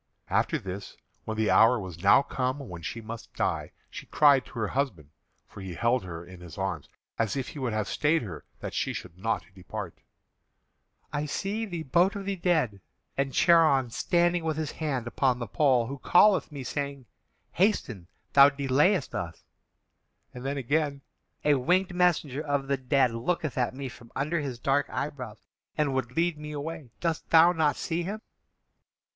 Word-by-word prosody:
After - - +2
this, 95 +1 -7 0.3
when 110 0 -4
the 110 -1 +2
hour 115 +2 +6
was 90 -4 -8
now 135 - +6
come 130 0 -2
when 90 -12 -8
she 85 +9 -5
must 115 0 -9
die, - - -1 0.2
she - - -8
cried 140 -4 +5
to - - -16
her 110 -5 -2
husband 100 - -2 0.4
(for 100 - -11
he 95 -2 -6
held 120 +4 +1
her 85 -1 -7
in 90 0 -12
his 85 -2 -11
arms, 95 -6 -3 0.3
as 110 -3 0
if 130 - -3
he 150 - -8
would 125 -4 -2
have 110 -1 -1
stayed 155 0 +1
her 90 -8 -7 0.2
that - - -5
she - - -1
should - - -7
not 110 +5 -2
depart): 95 0 -7 1.1
"I 150 0 -1
see 205 +9 -2
the 170 -4 -4
boat 175 +8 +3
of 200 -1 -5
the 200 0 -1
dead, 160 - 0 0.3
and 135 0 0
Charon 155 -7 +4
standing 175 +6 +1
with 160 -2 -1
his 155 -2 -2
hand 140 -7 -2
upon 125 +1 +1
the 120 - -4
pole, 125 +1 +2
who 140 +3 -6
calleth 195 -1 +5
me, 140 -3 -6
saying, 140 0 -4 0.5
'Hasten; 125 - 0 0.3
thou 140 0 +9
delayest 145 +5 +2
us'; 85 -2 -5 0.9
and 125 - -8
then 140 +1 -2
again, 140 +2 0 0.4
'A 150 - +5
winged 180 +7 +2
messenger 170 -6 +1
of 145 -3 -1
the 140 0 0
dead 130 -1 +2
looketh 140 +6 -2
at 125 -1 0
me 135 0 -5
from 120 -1 -13
under 155 +5 0
his 135 -5 -4
dark 135 +4 +1
eyebrows, 125 -7 -5 0.3
and 150 -3 +1
would 130 -1 -2
lead 165 -2 +1
me 150 0 -7
away. 150 -2 -6
Dost 165 -2 -2
thou 165 +1 +7
not 160 -4 +2
see 165 0 -2
him?'" 205 +5 -4
135 Hz, 180 wpm, -28 LUFS, 115-160 Hz, 1.1 s, thou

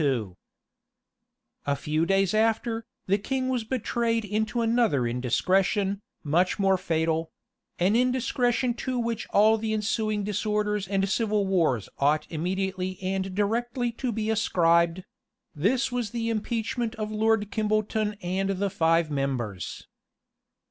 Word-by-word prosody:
} - - -38
A 140 - +2
few 155 +4 -1
days 195 -1 +2
after, 225 +1 +1 0.2
the 200 +2 +2
king 260 +4 -2
was 250 -3 0
betrayed 230 -1 -1
into 220 +3 -1
another 225 - +2
indiscretion, 190 - +1 0.2
much 170 +5 +2
more 195 -2 +3
fatal; 165 -2 -1 0.5
an 190 +5 +2
indiscretion 250 0 +1
to 255 +1 -3
which 235 -2 -2
all 220 +2 +4
the 220 0 -1
ensuing 215 0 0
disorders 210 -1 -1
and 195 0 +1
civil 210 0 +1
wars 165 - +1
ought 150 +2 +2
immediately 185 +2 -2
and 190 0 -2
directly 240 +4 0
to 245 +1 -3
be 220 0 -1
ascribed; 170 -4 +2 0.5
this 240 - +1
was 245 -3 -2
the 230 +1 -2
impeachment 230 +2 -2
of 215 -1 -4
Lord 215 -1 +1
Kimbolton 215 0 0
and 190 +2 -1
the 195 0 -1
five 165 -1 +2
members. 125 - -3
210 Hz, 130 wpm, -26 LUFS, 180-225 Hz, 0.5 s, all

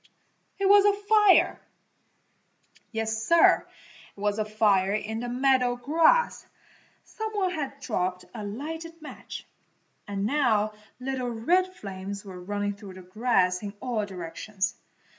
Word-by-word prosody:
It 395 -1 +1
was 405 0 +7
a 405 0 +3
fire! 420 -2 +5 1.3
Yes, 225 -1 -2
Sir, 335 +7 +5 0.5
it - - -13
was 205 +1 0
a 215 - 0
fire 205 -3 +2
in 220 +1 -3
the 240 +1 -4
meadow 250 -1 +2
grass! 320 - +3 0.6
Some 440 0 -5
one 385 -3 0
had 280 -5 -4
dropped 180 -7 -2
a 220 -3 -6
lighted 320 +10 -6
match, 305 - -9 0.6
and 200 -1 -2
now 220 -5 +2 0.3
little 255 -1 -3
red 360 +12 +1
flames 200 - -7
were 185 -2 -9
running 205 +2 -2
through 200 -2 -11
the 185 - -11
grass 185 -2 +1
in 205 -1 -6
all 240 -4 -1
directions. 190 +2 -4
225 Hz, 135 wpm, -27 LUFS, 200-300 Hz, 1.3 s, was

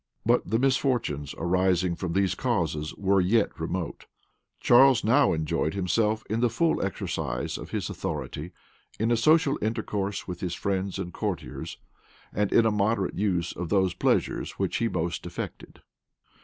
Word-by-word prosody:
But - - +2
the 110 - +2
misfortunes 120 - 0
arising 90 0 +1
from 85 0 -4
these 95 -1 +2
causes 85 -12 -1
were 100 -1 +2
yet 100 +2 +1
remote. 85 0 -4 0.5
Charles 130 +1 +6
now 135 +6 +4
enjoyed 80 +1 -1
himself 105 +3 +1
in 110 +2 -1
the 120 0 +3
full 160 +9 +1
exercise 65 -9 -3
of - - -7
his - - -2
authority, 80 +5 -5 0.5
in 115 +2 +1
a - - +4
social 150 +4 +3
intercourse 105 -2 -2
with 90 -2 -5
his 90 -2 -3
friends 95 -1 -2
and 90 -3 -5
courtiers, - - -4 0.6
and 105 0 0
in 115 - +5
a 110 - +3
moderate 105 -1 0
use 90 -4 0
of 90 -2 -5
those 95 -3 +2
pleasures - - 0
which - - -1
he 115 - +1
most 85 -1 -3
affected. 85 - -8
100 Hz, 155 wpm, -27 LUFS, 90-115 Hz, 0.6 s, Charles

